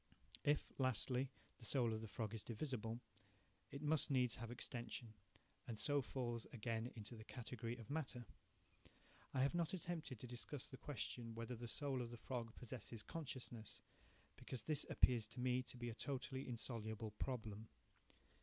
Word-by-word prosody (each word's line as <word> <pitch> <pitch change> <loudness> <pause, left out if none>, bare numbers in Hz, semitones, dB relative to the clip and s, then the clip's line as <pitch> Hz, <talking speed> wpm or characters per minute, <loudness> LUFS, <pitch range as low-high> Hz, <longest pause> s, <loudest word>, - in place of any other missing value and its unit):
If, 145 0 +4
lastly, 130 +1 +3 0.3
the 115 - -9
soul 120 -5 +5
of 110 - -1
the 110 - -3
frog 110 +1 -1
is 110 - -2
divisible, 115 -2 -1 0.7
it 140 +1 -4
must 150 0 +4
needs 125 -4 +5
have 115 -1 -3
extension, 120 -2 -3 0.5
and 115 -2 -2
so 145 +4 +6
falls 120 -2 -1
again 115 0 0
into 110 +1 -4
the 110 - -7
category 120 0 -3
of 115 0 -7
matter. 135 -6 0 1.1
I 130 - +3
have 140 - +4
not 170 +1 +3
attempted 165 -9 -2
to - - -5
discuss 125 +3 -3
the - - -7
question 120 -5 -2
whether 115 +2 -2
the 120 +1 -4
soul 135 +1 +1
of 120 - -2
the 120 - -5
frog 115 -1 -2
possesses 120 -3 -5
consciousness, 130 -8 -4 0.6
because 130 - -3
this 155 -3 +2
appears 115 -3 +6
to 115 +3 -8
me 125 0 +4
to 125 - -6
be 120 -1 -1
a - - -4
totally 135 +1 -1
insoluble 110 -2 -1
problem. 110 -4 -1
120 Hz, 165 wpm, -45 LUFS, 115-130 Hz, 1.1 s, so